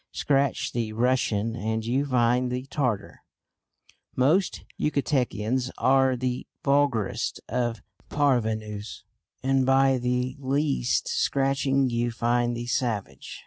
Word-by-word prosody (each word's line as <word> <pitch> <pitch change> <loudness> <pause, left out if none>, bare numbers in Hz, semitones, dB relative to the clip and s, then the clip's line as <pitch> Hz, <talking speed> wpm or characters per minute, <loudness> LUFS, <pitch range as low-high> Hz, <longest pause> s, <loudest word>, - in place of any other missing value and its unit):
"Scratch 140 -2 0
the 115 -2 -2
Russian 115 -2 +1
and 110 +1 -2
you 135 +5 0
find 125 -1 +2
the 125 +1 -3
Tartar." 125 -8 -2 0.9
Most 155 +9 +2
Yucatecans 130 -4 0
are 130 0 +3
the 125 0 -3 0.2
vulgarest 140 -7 +1
of 120 -3 -2 0.3
parvenus, 110 -7 -1 0.4
and 135 0 +2
by 135 0 +3
the 125 +1 -1
least 140 -1 0
scratching 135 -1 +1
you 120 +1 0
find 120 +1 0
the 120 - -4
savage. 115 - -3
125 Hz, 105 wpm, -26 LUFS, 115-135 Hz, 0.9 s, are